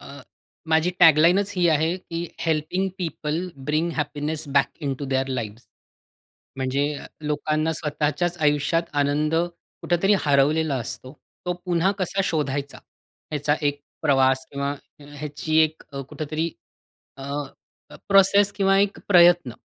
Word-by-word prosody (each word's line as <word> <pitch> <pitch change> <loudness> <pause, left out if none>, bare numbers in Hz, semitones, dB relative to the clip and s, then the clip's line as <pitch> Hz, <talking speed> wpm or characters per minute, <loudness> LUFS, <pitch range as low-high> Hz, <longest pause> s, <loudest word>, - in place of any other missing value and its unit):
अ, 140 +1 -11 0.5
माझी 160 +2 +3
टॅगलाईनच 175 +5 +5
ही 180 -1 +3
आहे 160 +2 +2
की 170 -2 -6 0.2
helping 160 +4 0
people 160 -2 -3 0.3
bring 155 +3 +1
happiness 150 +1 -3
back 140 -1 +4
into 140 -1 -3
there 130 0 +1
lives. 120 -3 -4 0.9
म्हणजे 135 +3 0
अ, - - -8
लोकांना 155 +1 -1
स्वतःच्याच 155 +3 -1
आयुष्यात 150 +3 +2 0.2
आनंद 150 +2 0
कुठेतरी 175 +3 0
हरवलेला 145 +1 +2
असतो. 130 +2 -6 0.3
तो 180 - +1
पुन्हा 180 +1 +2
कसा 195 +1 -1
शोधायचा, 145 -4 -2 0.5
याचा 150 0 +1
एक 145 0 0 0.2
प्रवास 130 -1 +3
किंवा 140 0 -2 0.3
ह्याची 145 +2 -4
एक 155 0 -1
अ, 140 - -5
कुठेतरी 155 +2 -3 0.7
अ, 135 - -10 0.9
प्रोसेस 200 +1 +5
किंवा 195 -1 +2
एक 200 0 +1
प्रयत्न 175 -7 +5
155 Hz, 120 wpm, -23 LUFS, 145-170 Hz, 0.9 s, टॅगलाईनच